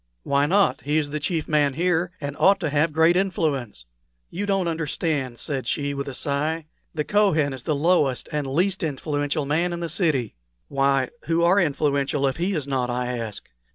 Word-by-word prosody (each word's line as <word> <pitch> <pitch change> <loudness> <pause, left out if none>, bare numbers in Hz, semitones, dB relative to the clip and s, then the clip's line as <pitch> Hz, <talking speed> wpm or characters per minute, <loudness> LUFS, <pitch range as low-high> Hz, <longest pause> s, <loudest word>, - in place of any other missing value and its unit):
"Why 140 +1 +2
not? 200 +4 +2
He 150 +2 0
is 145 -2 -1
the 150 - -2
chief 160 +1 -2
man 145 -3 +2
here, 175 +1 +1
and 145 -1 -5
ought 195 0 +5
to 155 -4 -1
have 150 +2 +2
great 160 +3 +4
influence." 150 - -1 0.5
"You 205 +4 -3
don't 195 -3 +1
understand," 155 -5 -2
said 130 0 -3
she, 145 +1 -1
with 140 0 -4
a 135 - -5
sigh. 150 +4 -1 0.3
"The 150 - 0
Kohen 160 -8 +2
is 130 - -7
the 150 +5 -1
lowest 145 -4 +2
and 150 -2 -2
least 180 +8 +1
influential 145 -1 -1
man 170 +5 0
in 170 - -4
the 170 -1 -3
city." 155 - 0 0.4
"Why, 135 -1 +2 0.2
who 165 0 +1
are 180 +4 +5
influential 140 -3 +1
if 135 -1 0
he 180 +3 0
is 150 -4 -2
not?" 130 -3 -1
I 125 0 -2
asked. 115 -3 -6
150 Hz, 190 wpm, -24 LUFS, 140-170 Hz, 0.5 s, ought